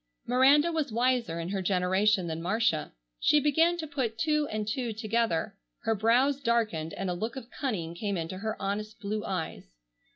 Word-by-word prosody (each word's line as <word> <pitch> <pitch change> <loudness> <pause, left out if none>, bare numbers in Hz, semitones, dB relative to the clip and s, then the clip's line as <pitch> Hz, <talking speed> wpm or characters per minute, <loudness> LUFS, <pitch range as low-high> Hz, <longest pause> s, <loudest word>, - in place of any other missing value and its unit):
Miranda 275 +6 +5
was 310 -5 -1
wiser 235 -7 +1
in 165 +1 -4
her 195 0 -1
generation 190 +1 +2
than 165 -1 -4
Marcia. 180 -4 0 0.3
She 300 - +4
began 325 +4 +3
to 325 - -4
put 260 -7 -2
two 300 +4 +1
and 215 -3 -3
two 235 +1 -2
together. 220 -4 -1 0.3
Her 225 - +2
brows 245 +7 +2
darkened, 215 - 0
and 195 - -3
a 180 - 0
look 220 +8 -4
of 255 -2 -8
cunning 185 - -3
came 200 +2 -2
into 165 +3 -4
her 220 +1 -3
honest 210 +2 -3
blue 210 +1 -3
eyes. 160 - -5
220 Hz, 175 wpm, -29 LUFS, 185-255 Hz, 0.3 s, Miranda